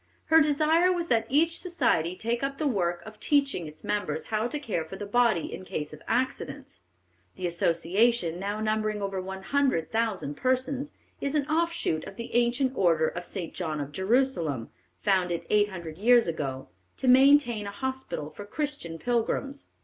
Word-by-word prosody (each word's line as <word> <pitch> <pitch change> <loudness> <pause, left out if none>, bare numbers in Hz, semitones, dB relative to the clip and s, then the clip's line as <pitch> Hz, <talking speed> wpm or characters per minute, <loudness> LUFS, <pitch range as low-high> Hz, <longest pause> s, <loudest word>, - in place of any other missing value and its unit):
Her 320 - +9
desire 310 +4 +3
was 345 -2 -2
that 225 -2 +2
each 325 +4 +2
society 235 - +1
take 235 +4 -2
up 275 0 -2
the 310 - -2
work 175 -9 0
of 215 -1 -11
teaching 275 - +1
its 150 0 -12
members 185 -7 -2
how 215 +2 +1
to 270 - -4
care 215 - -2
for 160 +4 -9
the 205 - -6
body 220 -4 +2
in - - -7
case 150 -4 -5
of 155 - -11
accidents. 255 - -2 0.5
The 185 - -5
association, 175 +2 +1
now 205 +2 -3
numbering 215 -1 0
over 195 -1 -2
one 190 +1 -7
hundred 270 - +1
thousand 220 -10 -1
persons, 260 +2 0 0.3
is 280 +1 -1
an 290 -2 +2
offshoot 320 - 0
of - - -9
the 230 - -7
ancient 245 +2 +2
order 165 -6 +3
of 175 0 -6
St. 175 -3 -5
John 160 -4 -3
of 145 0 -4
Jerusalem, 190 - 0 0.3
founded 180 -3 +1
eight 210 0 +4
hundred 170 -3 -8
years 240 +1 +5
ago, 135 -5 -4 0.3
to 260 - -3
maintain 255 -4 +5
a - - -4
hospital 260 - -4
for 205 - -9
Christian 285 - -4
pilgrims. 245 - -1
215 Hz, 170 wpm, -27 LUFS, 175-265 Hz, 0.5 s, Her